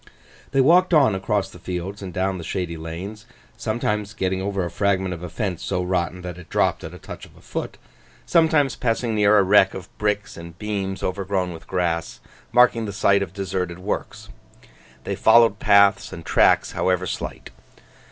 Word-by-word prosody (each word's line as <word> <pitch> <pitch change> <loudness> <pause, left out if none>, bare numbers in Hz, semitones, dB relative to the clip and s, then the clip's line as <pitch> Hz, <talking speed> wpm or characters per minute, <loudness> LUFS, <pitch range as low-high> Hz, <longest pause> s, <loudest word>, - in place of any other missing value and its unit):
They 135 - +2
walked 175 +5 +5
on 135 -8 +5
across 95 +1 -1
the 90 - -13
fields 90 +3 -5
and 95 -2 -6
down 95 0 -1
the - - -7
shady 85 0 -3
lanes, 90 +8 -7 0.3
sometimes 105 -2 -2
getting 95 -2 -1
over 100 -1 -2
a 85 - -5
fragment 95 -1 0
of 85 - -8
a 90 - -6
fence 90 0 -3
so 90 - -1
rotten 90 -1 -2
that 90 -1 -7
it 90 - -14
dropped - - +1
at - - -8
a - - -9
touch - - -10
of - - -14
the - - -18
foot, - - -5 0.5
sometimes 155 -5 +3
passing 115 -1 -1
near 105 0 +4
a 100 - +5
wreck 95 0 +4
of 95 0 -10
bricks 105 0 -1
and 85 0 -10
beams 100 -2 -4
overgrown 95 -1 -2
with 80 - -12
grass, 85 -3 -2 0.3
marking 120 -2 +4
the 100 - -5
site 100 0 +3
of 95 - -3
deserted 95 -2 -3
works. 95 +3 -5 0.7
They - - -3
followed 115 -3 +5
paths 100 -1 +4
and - - -9
tracks, - - +3
however 90 0 0
slight. - - -6
95 Hz, 180 wpm, -22 LUFS, 90-105 Hz, 0.7 s, walked